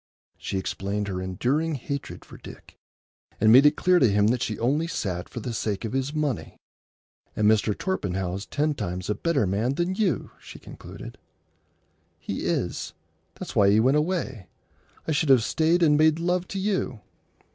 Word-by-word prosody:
She 95 Hz, -, -3 dB
explained 100 Hz, +2 st, -3 dB
her 95 Hz, -1 st, -3 dB
enduring 135 Hz, -, -1 dB
hatred 140 Hz, +2 st, -6 dB
for -, -, -13 dB
Dick, -, -, -13 dB, 0.6 s
and 110 Hz, -, +5 dB
made 135 Hz, +5 st, +8 dB
it 150 Hz, -, +3 dB
clear 180 Hz, -1 st, +3 dB
to 125 Hz, -, +4 dB
him 105 Hz, +1 st, +3 dB
that 125 Hz, 0 st, 0 dB
she 110 Hz, -, -2 dB
only 145 Hz, +8 st, 0 dB
sat 90 Hz, -, -4 dB
for 120 Hz, -, -7 dB
the 120 Hz, +1 st, -4 dB
sake 105 Hz, 0 st, -2 dB
of 110 Hz, -, -5 dB
his 135 Hz, +1 st, -1 dB
money. 150 Hz, -5 st, -3 dB, 0.8 s
"And 105 Hz, -, +2 dB
Mr. 105 Hz, -1 st, +2 dB
Torpenhow's 95 Hz, -, -3 dB
ten 150 Hz, +1 st, 0 dB
times 90 Hz, -6 st, -4 dB
a -, -, +2 dB
better 150 Hz, -3 st, 0 dB
man 110 Hz, +8 st, 0 dB
than 175 Hz, +3 st, -1 dB
you," 190 Hz, -, -1 dB
she -, -, -12 dB
concluded. -, -, -11 dB, 1.0 s
"He -, -, -5 dB
is. -, -, -2 dB, 0.4 s
That's -, -, -8 dB
why 100 Hz, -1 st, +5 dB
he 105 Hz, +2 st, +4 dB
went 130 Hz, +5 st, +3 dB
away. 150 Hz, -, -2 dB, 0.6 s
I -, -, 0 dB
should 150 Hz, 0 st, +1 dB
have 130 Hz, -4 st, +6 dB
stayed 165 Hz, +7 st, +2 dB
and 150 Hz, -2 st, +4 dB
made 155 Hz, 0 st, +4 dB
love 175 Hz, +1 st, -1 dB
to 195 Hz, -, -5 dB
you." 190 Hz, -, -2 dB
130 Hz, 175 wpm, -25 LUFS, 105-160 Hz, 1.0 s, made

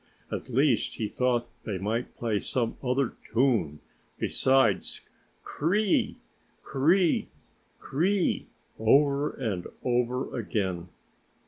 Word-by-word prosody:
At -, -, -4 dB
least, 130 Hz, 0 st, +2 dB
he 110 Hz, -, -2 dB
thought 125 Hz, +1 st, 0 dB, 0.2 s
they 105 Hz, -3 st, -3 dB
might 110 Hz, +6 st, -2 dB
play 110 Hz, -3 st, 0 dB
some 115 Hz, 0 st, -1 dB
other 130 Hz, -1 st, 0 dB, 0.2 s
tune 115 Hz, -, +2 dB, 0.4 s
besides 130 Hz, -6 st, +2 dB, 0.4 s
cr 145 Hz, -, -7 dB
r 165 Hz, -, +4 dB
r -, -, +4 dB
i! 210 Hz, -3 st, +2 dB, 0.5 s
cr 135 Hz, -, -7 dB
r -, -, -1 dB
r -, -, +6 dB
i! 180 Hz, -4 st, +2 dB, 0.5 s
cr -, -, -13 dB
r 145 Hz, -, +1 dB
r 185 Hz, -, +5 dB
i! 200 Hz, -3 st, +1 dB, 0.3 s
over 140 Hz, +5 st, +4 dB
and 105 Hz, -9 st, -3 dB, 0.2 s
over 125 Hz, +1 st, 0 dB
again. 95 Hz, -6 st, -2 dB
125 Hz, 140 wpm, -28 LUFS, 110-140 Hz, 0.5 s, r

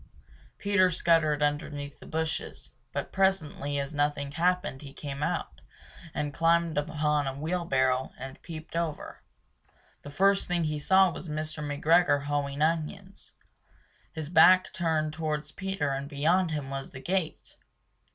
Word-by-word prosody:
Peter 200 Hz, -2 st, +3 dB
scuttered 155 Hz, -3 st, +2 dB
underneath 145 Hz, -1 st, -2 dB
the -, -, -13 dB
bushes, 160 Hz, 0 st, -4 dB, 0.2 s
but -, -, -4 dB
presently 165 Hz, -7 st, 0 dB
as 140 Hz, +1 st, -3 dB
nothing 145 Hz, -1 st, 0 dB
happened, 175 Hz, -3 st, 0 dB
he 140 Hz, -2 st, -10 dB
came 140 Hz, -1 st, -6 dB
out -, -, -2 dB, 0.5 s
and 145 Hz, -1 st, -2 dB
Climbed 165 Hz, 0 st, +2 dB
upon 150 Hz, -1 st, 0 dB
a 135 Hz, -, -3 dB
wheelbarrow, 135 Hz, -5 st, 0 dB
and 135 Hz, 0 st, -9 dB
peeped 160 Hz, -1 st, -9 dB
over. 165 Hz, -3 st, -3 dB, 0.8 s
The 145 Hz, -, -9 dB
first 195 Hz, +6 st, +3 dB
thing 175 Hz, -1 st, 0 dB
he 155 Hz, -1 st, -1 dB
saw 190 Hz, +4 st, +5 dB
was 170 Hz, -, -8 dB
Mr. 155 Hz, 0 st, -4 dB
McGregor 145 Hz, 0 st, +3 dB
hoeing 145 Hz, 0 st, -1 dB
onions. 165 Hz, +4 st, -3 dB, 0.8 s
His 160 Hz, -3 st, -6 dB
back 185 Hz, +1 st, +7 dB
was -, -, -13 dB
turned 160 Hz, -3 st, 0 dB
towards 155 Hz, -1 st, -3 dB
Peter 190 Hz, -6 st, -2 dB
and 140 Hz, +1 st, -3 dB
beyond 165 Hz, +5 st, +2 dB
him 145 Hz, -3 st, -4 dB
was 135 Hz, 0 st, -5 dB
the 130 Hz, -, -10 dB
gate! 180 Hz, 0 st, -2 dB
155 Hz, 140 wpm, -28 LUFS, 145-170 Hz, 0.8 s, back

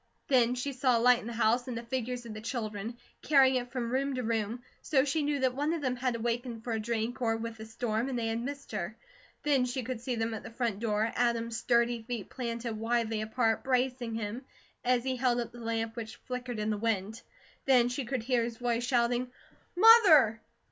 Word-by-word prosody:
Then 250 Hz, -2 st, +4 dB
she 275 Hz, +3 st, -3 dB
saw 255 Hz, -2 st, +2 dB
a -, -, +1 dB
light 245 Hz, +1 st, +5 dB
in 225 Hz, -, -8 dB
the 235 Hz, -, -5 dB
house, 235 Hz, +2 st, +2 dB
and 245 Hz, -2 st, -4 dB
the 235 Hz, -, -5 dB
figures 245 Hz, 0 st, -3 dB
of 225 Hz, -, -7 dB
the 215 Hz, -, -7 dB
children, 220 Hz, -1 st, -4 dB, 0.2 s
carrying 270 Hz, -3 st, +5 dB
it 245 Hz, -1 st, -4 dB
from 240 Hz, -2 st, -3 dB
room 270 Hz, +1 st, 0 dB
to 255 Hz, -, -2 dB
room, 225 Hz, +1 st, -2 dB, 0.2 s
so 275 Hz, -2 st, +2 dB
she 295 Hz, +3 st, 0 dB
knew 290 Hz, -1 st, 0 dB
that 260 Hz, -1 st, +2 dB
one 290 Hz, +4 st, 0 dB
of 325 Hz, -3 st, -3 dB
them 255 Hz, -2 st, 0 dB
had 250 Hz, -1 st, -1 dB
awakened 235 Hz, 0 st, -3 dB
for 235 Hz, -, -3 dB
a 220 Hz, -, -1 dB
drink, 235 Hz, +3 st, -2 dB
or 225 Hz, -2 st, +1 dB
with 225 Hz, 0 st, -5 dB
the 220 Hz, 0 st, -9 dB
storm, 225 Hz, +2 st, -2 dB
and 255 Hz, -, -2 dB
they 235 Hz, -, -1 dB
had 225 Hz, +1 st, -1 dB
missed 280 Hz, +3 st, -6 dB
her. -, -, -4 dB, 0.5 s
Then 280 Hz, -4 st, +3 dB
she 250 Hz, +1 st, -3 dB
could 240 Hz, -1 st, -4 dB
see 245 Hz, 0 st, -2 dB
them 225 Hz, 0 st, -1 dB
at 220 Hz, -, -5 dB
the -, -, -9 dB
front 230 Hz, -3 st, -2 dB
door, 220 Hz, 0 st, 0 dB
Adam's 235 Hz, -1 st, 0 dB
sturdy 235 Hz, 0 st, +2 dB
feet 225 Hz, -3 st, -6 dB
planted 235 Hz, -2 st, -3 dB
widely 225 Hz, -1 st, 0 dB
apart, 225 Hz, +1 st, 0 dB
bracing 250 Hz, -2 st, 0 dB
him, 225 Hz, +3 st, -4 dB, 0.4 s
as 250 Hz, -1 st, +2 dB
he 260 Hz, -1 st, -1 dB
held 245 Hz, -1 st, +2 dB
up 235 Hz, -1 st, -3 dB
the 240 Hz, -, -12 dB
lamp 225 Hz, -1 st, -2 dB
which 220 Hz, -2 st, -6 dB
flickered 250 Hz, -2 st, -4 dB
in 215 Hz, 0 st, -1 dB
the 210 Hz, -, -1 dB
wind. 220 Hz, 0 st, -1 dB, 0.4 s
Then 250 Hz, -3 st, +5 dB
she 250 Hz, +3 st, -2 dB
could 250 Hz, -1 st, -3 dB
hear 245 Hz, -1 st, +1 dB
his 230 Hz, -1 st, -4 dB
voice 240 Hz, -1 st, -1 dB
shouting: 245 Hz, 0 st, +1 dB, 0.4 s
"Mother!" 350 Hz, -, +7 dB
240 Hz, 225 wpm, -30 LUFS, 225-255 Hz, 0.5 s, Mother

